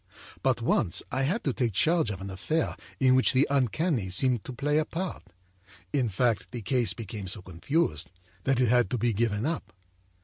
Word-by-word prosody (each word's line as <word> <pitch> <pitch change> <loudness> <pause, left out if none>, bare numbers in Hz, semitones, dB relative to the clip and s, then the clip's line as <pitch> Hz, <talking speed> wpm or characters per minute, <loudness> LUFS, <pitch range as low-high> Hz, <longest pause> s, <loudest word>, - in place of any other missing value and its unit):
But 130 -3 +1
once 95 -6 +2
I 130 - 0
had 180 - 0
to 135 - 0
take 120 -4 0
charge 160 - +3
of 95 -2 -5
an 95 0 -5
affair 155 - -1 0.2
in 130 -1 +5
which 130 0 +4
the 130 +2 +5
uncanny 135 - +1
seemed 120 +4 +1
to - - -5
play 145 +4 +1
a 155 - +1
part. 180 +4 -4 0.7
In 130 -5 +2
fact, 115 +2 0
the 120 -3 -6
case 125 +2 +1
became 105 -3 -6
so 95 +1 -4
confused 90 - -1 0.4
that 135 -2 +2
it 125 -3 +3
had 120 -4 +4
to 125 - -1
be 120 0 +1
given 110 +1 0
up. 160 +1 -3
125 Hz, 195 wpm, -28 LUFS, 105-140 Hz, 0.7 s, in